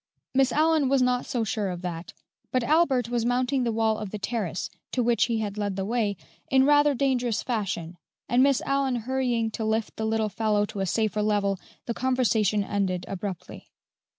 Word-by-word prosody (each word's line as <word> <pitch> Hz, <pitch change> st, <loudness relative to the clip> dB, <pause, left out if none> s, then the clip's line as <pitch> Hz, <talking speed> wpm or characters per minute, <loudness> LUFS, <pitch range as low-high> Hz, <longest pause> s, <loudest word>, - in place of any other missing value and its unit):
Miss 265 Hz, -1 st, +3 dB
Allyn 310 Hz, -2 st, +3 dB
was 270 Hz, -1 st, +3 dB
not 250 Hz, 0 st, +1 dB
so 240 Hz, -3 st, -1 dB
sure 210 Hz, -2 st, -1 dB
of 180 Hz, 0 st, -6 dB
that; 170 Hz, -1 st, -5 dB, 0.4 s
but 255 Hz, -2 st, +1 dB
Albert 275 Hz, -5 st, +2 dB
was 240 Hz, -1 st, 0 dB
mounting 250 Hz, +2 st, +1 dB
the 235 Hz, -, 0 dB
wall 220 Hz, -1 st, +1 dB
of 210 Hz, -2 st, -5 dB
the 210 Hz, -, -5 dB
terrace, 200 Hz, -5 st, -3 dB, 0.3 s
to 250 Hz, -, +1 dB
which 235 Hz, 0 st, +3 dB
he 230 Hz, -2 st, -1 dB
had 210 Hz, -1 st, -4 dB
led 205 Hz, -2 st, -1 dB
the 195 Hz, 0 st, -2 dB
way, 215 Hz, -3 st, 0 dB, 0.3 s
in 265 Hz, 0 st, +4 dB
rather 290 Hz, 0 st, +4 dB
dangerous 245 Hz, -4 st, 0 dB
fashion, 190 Hz, -8 st, -3 dB, 0.3 s
and 245 Hz, +2 st, +3 dB
Miss 275 Hz, -1 st, +3 dB
Allyn 275 Hz, -3 st, 0 dB
hurrying 245 Hz, -4 st, 0 dB
to 220 Hz, -, -4 dB
lift 220 Hz, 0 st, -1 dB
the 220 Hz, -, -2 dB
little 220 Hz, -1 st, 0 dB
fellow 210 Hz, 0 st, +1 dB
to 205 Hz, -, -7 dB
a 195 Hz, -, 0 dB
safer 215 Hz, +1 st, 0 dB
level, 205 Hz, -2 st, +1 dB, 0.3 s
the 235 Hz, -, -2 dB
conversation 225 Hz, -5 st, +1 dB
ended 190 Hz, -3 st, -1 dB
abruptly. 195 Hz, -2 st, -6 dB
225 Hz, 190 wpm, -26 LUFS, 205-255 Hz, 0.4 s, in